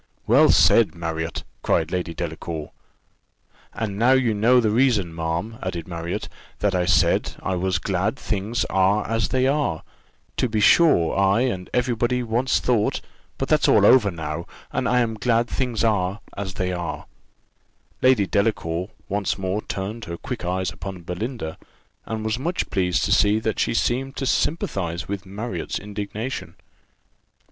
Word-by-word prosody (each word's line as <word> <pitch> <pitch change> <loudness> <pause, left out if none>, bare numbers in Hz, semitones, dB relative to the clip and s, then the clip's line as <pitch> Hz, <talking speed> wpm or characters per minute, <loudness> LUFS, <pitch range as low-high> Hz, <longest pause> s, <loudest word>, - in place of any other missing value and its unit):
"Well - - +5
said, 115 -5 +5
Marriott," 80 -1 -4 0.2
cried 80 -1 +1
Lady 90 -2 -2
Delacour. 80 -2 -5 1.0
"And 105 -3 -4
now 125 +3 +5
you 125 -4 +3
know 115 +5 +4
the 110 -3 +2
reason, 110 -8 +2
ma'am," 85 +7 -3
added 85 -3 -4
Marriott, 85 0 -4 0.3
"that 105 -1 0
I 90 -1 +1
said, 95 - +2
I 95 - -1
was 90 0 0
glad 95 +5 -1
things 105 -2 -2
are 95 +2 +2
as 115 0 0
they 130 +1 +1
are. 135 - 0 0.5
To 125 - +1
be 110 -1 0
sure 105 - +5
I 100 +3 +3
and 95 -8 -2
every 125 0 +1
body 120 +2 0
once 120 +3 +1
thought 115 -4 +1 0.4
but - - -2
that's - - +3
all - - +5
over 120 -5 +6
now 80 -1 -5 0.2
and - - -1
I 125 +1 +3
am 115 -2 0
glad 120 +1 +2
things 120 -4 -1
are 100 -3 +1 0.2
as 95 -1 -5
they 90 -1 -1
are." 85 -2 -4 1.0
Lady 130 -6 +4
Delacour 95 -2 0 0.2
once 100 -1 -1
more 95 +2 -2
turned 105 +4 -5
her 85 -1 -6
quick 120 +3 -6
eyes 90 0 -1
upon 90 +2 -8
Belinda, 90 -1 -5 0.5
and 110 -1 -4
was 110 +2 -1
much 170 +6 -2
pleased 90 -2 +1
to - - -1
see 105 +1 +4
that 110 0 -2
she - - +1
seemed 135 +4 0
to 135 - -3
sympathize 95 - -1
with 100 0 -5
Marriott's 100 -2 -4
indignation. 105 +5 -5
100 Hz, 160 wpm, -23 LUFS, 90-115 Hz, 1.0 s, over